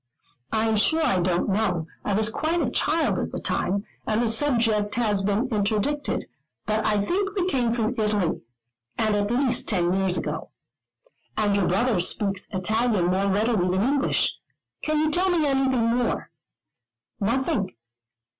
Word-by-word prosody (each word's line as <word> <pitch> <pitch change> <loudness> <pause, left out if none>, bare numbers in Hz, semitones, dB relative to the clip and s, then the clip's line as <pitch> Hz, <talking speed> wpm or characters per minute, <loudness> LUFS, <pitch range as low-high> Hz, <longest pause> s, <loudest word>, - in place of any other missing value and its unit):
"I 220 +1 +1
am 220 -1 +1
sure 315 +10 +3
I 190 -9 +2
don't 175 0 0
know. 190 -5 0 0.2
I 205 - 0
was 215 +1 +2
quite 320 +8 -1
a 260 -7 0
child 310 +5 +1
at - - -3
the - - -4
time, 195 +3 -1 0.2
and 215 0 +1
the 240 - +1
subject 225 -5 +2
has 215 -4 +1
been 205 +6 0
interdicted; 215 +6 -1 0.4
but 215 0 0
I 210 -1 +2
think 390 - -1
we 370 -3 0
came 250 -9 +1
from 230 0 0
Italy, 210 -5 0 0.6
and 215 -2 +1
at 205 0 0
least 250 0 +1
ten 180 -4 +1
years 190 -1 +1
ago." - - -4 0.9
"And 205 -2 +2
your 200 -3 +2
brother 210 +2 +1
speaks 195 +2 0
Italian 210 -1 +1
more 195 +2 +1
readily 195 -3 +1
than 205 +6 +2
English. 280 0 +2 0.5
Can 310 0 0
you 310 +1 +1
tell 365 +4 +2
me 340 -4 +2
anything 260 -4 +2
more?" 245 -1 -1 0.9
"Nothing. 210 - -1
220 Hz, 160 wpm, -24 LUFS, 200-260 Hz, 0.9 s, sure